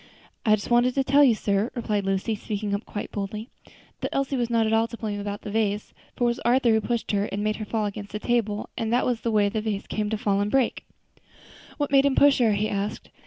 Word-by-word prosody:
"I 215 - +7
just 205 +3 -7
wanted 240 +1 +4
to 270 - +2
tell 280 +2 +5
you, 250 -5 +5
sir," 205 +2 0
replied 210 -4 -1
Lucy, 195 +3 0
speaking 210 -1 -3
up 200 +2 -2
quite 205 - -6
boldly, 210 +4 -5 0.5
"that - - -2
Elsie 275 0 -1
was 240 -2 -1
not 230 -1 +2
at 220 - 0
all 225 +1 +3
to 235 - -9
blame 210 -2 -3
about 205 0 -4
the 205 - -6
vase; 210 -1 -1 0.2
for - - -2
it - - +4
was 240 +1 +1
Arthur 240 0 +3
who 220 0 +3
pushed 235 +1 -2
her 200 -1 +1
and 205 0 -3
made 215 0 0
her 215 - -5
fall 215 0 -1
against 205 0 -6
the 210 - -3
table, 215 -2 -1
and 225 -1 -2
that 245 +1 +2
was 245 -2 0
the 235 - -1
way 210 -2 +3
the 215 +1 -2
vase 210 -2 -3
came 210 -1 -2
to 220 - -1
fall 200 -1 +1
and 205 - 0
break." 265 +1 +1 0.9
"What 290 -1 -1
made 275 0 +5
him 270 - +1
push 285 -2 +5
her?" 225 -4 +4
he 205 +1 0
asked. 200 +1 -4
220 Hz, 260 wpm, -25 LUFS, 205-240 Hz, 0.9 s, I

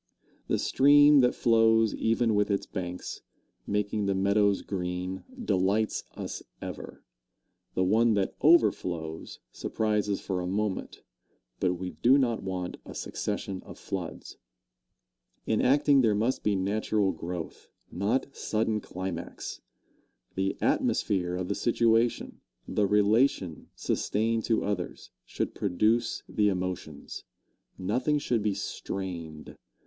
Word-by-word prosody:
The - - +1
stream 145 +1 +6
that 125 -1 +3
flows 115 -1 +4
even 115 0 +1
with 105 0 +2
its 100 -1 0
banks, 90 -2 -5 0.5
making 105 0 -1
the 100 - +1
meadows 100 +1 +2
green, 90 0 -4 0.2
delights 100 - +1
us - - -5 0.2
ever; - - -8 0.7
the 95 - +2
one 110 +4 +3
that 100 -2 0
overflows 90 - +2
surprises 105 -2 -1
for 95 -2 -3
a 90 - -3
moment. 100 +1 -3 0.6
But 90 -1 +1
we 90 +1 -5
do 130 +3 +4
not 120 -5 +1
want 90 -2 -4
a - - -10
succession 95 -1 -4
of - - -11
floods. - - -6 1.1
In 110 - +1
acting 140 +1 +4
there 110 -4 +3
must 115 +5 0
be 105 - +1
natural 100 +1 +1
growth, 85 0 -7 0.2
not 115 +9 -1
sudden 110 0 0
climax. 95 -3 -6 0.7
The 95 0 -1
atmosphere 90 -3 +1
of 90 0 -3
the 100 - 0
situation, 115 +1 +1 0.3
the 105 - +1
relation 105 - +2
sustained 110 +1 0
to 115 - +1
others, 100 -3 -4
should - - -3
produce 110 +5 +1
the 105 -1 +2
emotions. 90 -6 -4 0.5
Nothing 125 +10 0
should 120 -5 0
be 105 -1 0
strained. 85 -5 -6
105 Hz, 120 wpm, -28 LUFS, 95-115 Hz, 1.1 s, stream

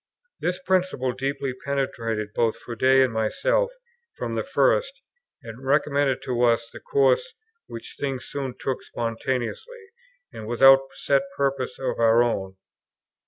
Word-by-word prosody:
This 180 +1 -1
principle 185 -8 0
deeply 135 +1 -3
penetrated 115 -6 -2
both 115 -2 +1
Froude 120 -2 -9
and 130 -2 +5
myself 485 - +1 0.5
from - - -3
the - - -1
first, - - +2 0.5
and 115 +3 -10
recommended 140 -1 +1
to 125 -2 -2
us 115 -1 +2
the - - -9
course 485 +1 +1 0.3
which - - -9
things 135 -3 -3
soon 135 -3 -5
took 135 -2 -3
spontaneously, 130 - -4 0.4
and 110 - -8
without 135 +3 +7 0.2
set 140 -1 +2 0.2
purpose 135 -2 -1
of 135 - -3
our 115 +1 +5
own. 95 -5 -2
135 Hz, 130 wpm, -24 LUFS, 120-150 Hz, 0.5 s, without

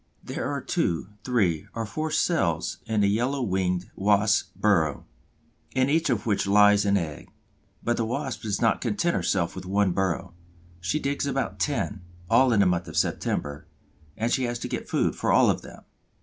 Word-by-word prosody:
There - - -4
are - - -2
two, 85 +3 -1
three, 95 -11 +1
or 115 -1 -2
four 155 +9 -3
cells 95 - 0
in 110 -1 +1
the 100 - +4
Yellow 125 +6 0
winged 90 -3 -1
Wasp's 105 +1 +2
burrow, 85 -9 +1 0.7
in 130 +1 +2
each 160 0 +2
of 115 -5 0
which 105 -3 0
lies 105 0 +5
an 100 0 +3
egg. 80 -5 -5 0.5
But 120 0 0
the 115 - 0
Wasp 130 +3 -3
does 105 -3 -2
not 115 - +2
content 175 -4 0
herself 85 -3 0
with 95 -1 -7
one 100 0 +2
burrow: 95 -1 -1 0.5
she 90 - -1
digs 140 0 -1
about 135 -1 -2
ten, 105 -9 -1 0.3
all 125 +2 +5
in 105 -3 +4
the - - +4
month 90 -1 +1
of 80 - -6
September, 75 0 -1 0.5
and 115 +2 -1
she 130 - +1
has 120 0 -2
to - - -5
get - - -5
food - - +1
for - - 0
all - - +5
of - - -3
them. - - -13
105 Hz, 185 wpm, -26 LUFS, 95-125 Hz, 0.7 s, lies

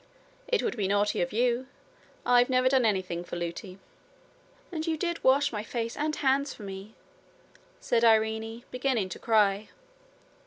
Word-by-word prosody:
'It 485 -4 +1
would - - -1
be 205 -4 -1
naughty 205 +1 +1
of 175 - -1
you. 245 +3 +1 0.6
I've 245 +1 +4
never 255 0 +3
done 260 -2 +3
anything 185 -5 -1
for 175 - -7
Lootie.' 175 +2 -5 0.9
'And 320 -1 -4
you 320 -1 0
did 340 +1 -3
wash 280 +2 +4
my 210 -3 -3
face 230 +1 -4
and 305 +1 -1
hands 275 +1 +1
for 215 - -11
me,' 195 +2 -8 0.8
said 235 -1 +1
Irene, 220 +1 +2
beginning 250 -6 0
to - - -7
cry. 210 -2 +2
230 Hz, 155 wpm, -28 LUFS, 205-260 Hz, 0.9 s, I've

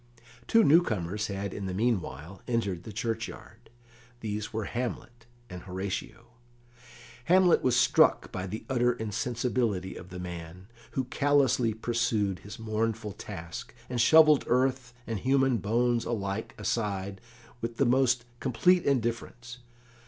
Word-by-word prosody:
Two 225 0 +5
newcomers 110 - +2
had 100 -1 -4
in 100 -2 -5
the 90 - -3
meanwhile 95 - -2
entered 100 -8 -1
the 110 - -7
churchyard. 115 0 -5 0.5
These 105 -1 -4
were 110 0 -2
Hamlet 120 0 -5 0.2
and 90 -4 -8
Horatio. 95 +5 -5 1.0
Hamlet 180 0 +5
was 125 -2 +2
struck 120 0 +4
by 95 0 -4
the 110 +4 -6
utter 125 -2 +2
insensibility 115 -3 -2
of 90 - -10
the 90 - -8
man, 90 0 -7 0.3
who 130 - 0
callously 130 -4 +2
pursued 110 -4 0
his 100 -1 -10
mournful 110 -1 -2
task, 90 -3 -8 0.2
and 120 -2 +1
shovelled 155 +3 +6
earth 130 -1 +1
and 115 -3 -3
human 135 +1 +2
bones 115 +3 +1
alike 100 -2 -3
aside 100 -3 -2 0.4
with 115 0 -4
the 140 - +3
most 125 -1 +3
complete 175 +8 +3
indifference. 120 -1 -2
115 Hz, 130 wpm, -29 LUFS, 100-125 Hz, 1.0 s, shovelled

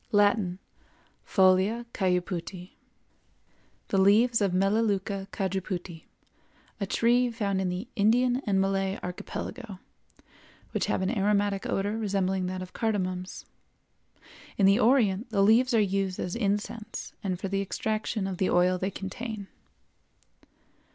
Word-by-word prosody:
Latin—Folia 200 +1 +1
Cajuputi. 180 -1 -2 1.2
The 195 - +2
leaves 220 +4 +4
of 200 -2 +2
Melaleuca 195 0 0
Cajuputi, 185 -3 -4 0.7
a 200 - -2
tree 245 +4 +3
found 200 -5 -1
in 185 - 0
the 180 +6 -4
Indian 245 +4 +3
and 195 -2 +2
Malay 195 0 0
Archipelago, 195 +4 -6 0.9
which - - -1
have - - 0
an 195 +6 -1
aromatic 200 -1 +1
odor 205 +3 -1
resembling 190 -3 0
that 185 0 -4
of 185 - -12
cardamoms. 185 -4 -2 1.1
In 195 - +4
the 195 +3 +5
Orient 230 -3 +3
the 200 -3 +2
leaves 230 +5 +4
are 230 - +4
used 195 -2 0
as 180 - -3
incense 210 0 -3
and 185 -3 -2
for 195 - -3
the 195 +1 -1
extraction 215 +1 -2
of 190 -2 -3
the 190 - +2
oil 180 +1 +3
they 190 - -1
contain. 200 +1 -6
195 Hz, 125 wpm, -28 LUFS, 185-220 Hz, 1.2 s, the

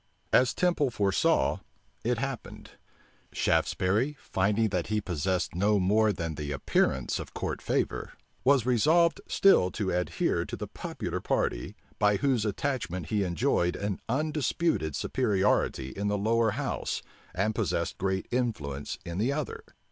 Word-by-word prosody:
As 125 0 +4
Temple 175 -6 +2
foresaw, 100 -5 +2 0.4
it 120 +1 +1
happened. 135 0 -5 0.6
Shaftesbury, 110 +11 +1
finding 105 +4 +1
that 90 -4 -1
he 110 0 0
possessed 95 0 -1
no 100 +4 +2
more 105 +3 +3
than 85 -4 -3
the 75 -1 -5
appearance 65 -2 0
of - - -8
court - - -3
favor, - - -1 0.3
was 135 -3 +4
resolved 160 +8 +3
still 195 - +5
to 100 -4 -1
adhere 90 0 0
to - - -6
the - - -5
popular - - -5
party, - - -1 0.2
by 105 0 +4
whose 125 -1 +1
attachment 100 - -2
he 105 -2 +1
enjoyed 85 0 +1
an 100 -1 -3
undisputed 150 - 0
superiority 100 - +1
in 100 +6 -3
the 105 0 +1
lower 115 +2 +2
house, 145 -1 -2 0.3
and 100 +4 +1
possessed - - -1
great 95 0 -1
influence 90 - -2
in 85 +2 -4
the 120 +6 +2
other. 150 -1 -4
105 Hz, 140 wpm, -28 LUFS, 90-125 Hz, 0.6 s, still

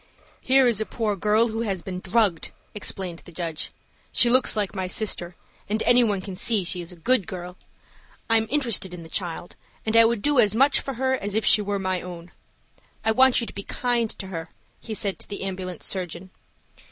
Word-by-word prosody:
"HERE 265 0 +4
is 225 -3 +1
a - - 0
poor 215 -3 -1
girl 210 +4 +2
who 225 +1 -3
has 195 -6 -2
been 185 -1 -5
drugged," 190 -3 +1 0.2
explained 190 -4 -3
the - - -14
judge. 165 -2 -4 0.4
"She 240 - +4
looks 255 -1 +4
like 205 -2 -1
my 190 -2 -3
sister, 180 -3 -2 0.3
and 215 +1 0
any 245 0 +5
one 205 -4 0
can 190 -1 -7
see 215 +1 +2
she 175 +1 -3
is 170 - -9
a - - -11
good 205 +3 +1
girl. 180 -1 -6 0.7
I 225 - +5
am 220 0 0
interested 230 -10 +1
in 170 - -9
the 160 - -12
child, 175 -1 -4 0.3
and 220 0 0
I 230 0 +8
would 225 -2 0
do 290 -3 +3
as 215 -3 +5
much 275 +4 +4
for 275 - -5
her 260 +2 0
as 205 -5 -3
if 220 -1 +1
she 215 - +5
were 205 0 -2
my 185 -1 -1
own. 175 -1 -9 0.7
I 220 - +4
want 260 +2 +5
you - - -2
to - - -9
be 200 - -5
kind 240 +1 -1
to 195 - -6
her," 165 -3 -6 0.3
he 220 - -6
said 200 -2 -2
to - - -6
the 200 -1 -5
ambulance 185 -3 -4
surgeon. 185 0 -2
205 Hz, 215 wpm, -24 LUFS, 180-230 Hz, 0.7 s, I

